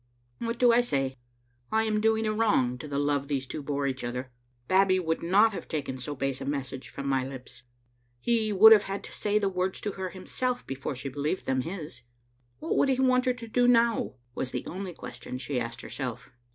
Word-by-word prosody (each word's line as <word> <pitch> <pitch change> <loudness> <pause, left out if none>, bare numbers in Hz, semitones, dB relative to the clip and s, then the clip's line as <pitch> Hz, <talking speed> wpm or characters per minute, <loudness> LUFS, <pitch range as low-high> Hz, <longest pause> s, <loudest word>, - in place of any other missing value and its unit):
What 230 0 -2
do 245 0 +6
I 240 - +6
say? 135 - -1 0.6
I 220 0 +3
am 215 -1 0
doing 220 0 +2
a 215 - +1
wrong 130 - +2
to 140 - -7
the 140 -1 -3
love 145 -1 +1
these 135 -2 -1
two 150 - -5
bore 140 0 -2
each 130 -2 -2
other. 125 +1 -4 0.4
Babbie 185 0 +4
would 160 -2 -1
not 200 +6 +5
have - - -6
taken 140 -5 -3
so 145 +3 -4
base 135 -1 -2
a - - -4
message 135 -2 -4
from 140 - -7
my 135 -1 +2
lips. 130 -1 -9 0.6
He 225 - +1
would 210 +3 +9
have 215 -2 +9
had 195 +1 -3
to - - -10
say 210 0 0
the 205 -2 +2
words 185 0 -1
to 210 - -2
her 190 -1 -4
himself 245 +7 -3
before 135 +1 -4
she 135 +2 -6
believed 145 +6 -2
them 130 -1 +1
his. 155 -5 -7 0.6
What - - -2
would 275 - +4
he 260 -1 +2
want 255 -1 +3
her 255 - +3
to 235 -2 -9
do 245 +2 +3
now? 235 - +3 0.2
was 130 - -3
the - - -4
only 185 -1 -5
question 120 -2 -7
she 130 0 -2
asked 115 0 -5
herself. 125 -4 -6
165 Hz, 220 wpm, -28 LUFS, 135-220 Hz, 0.6 s, would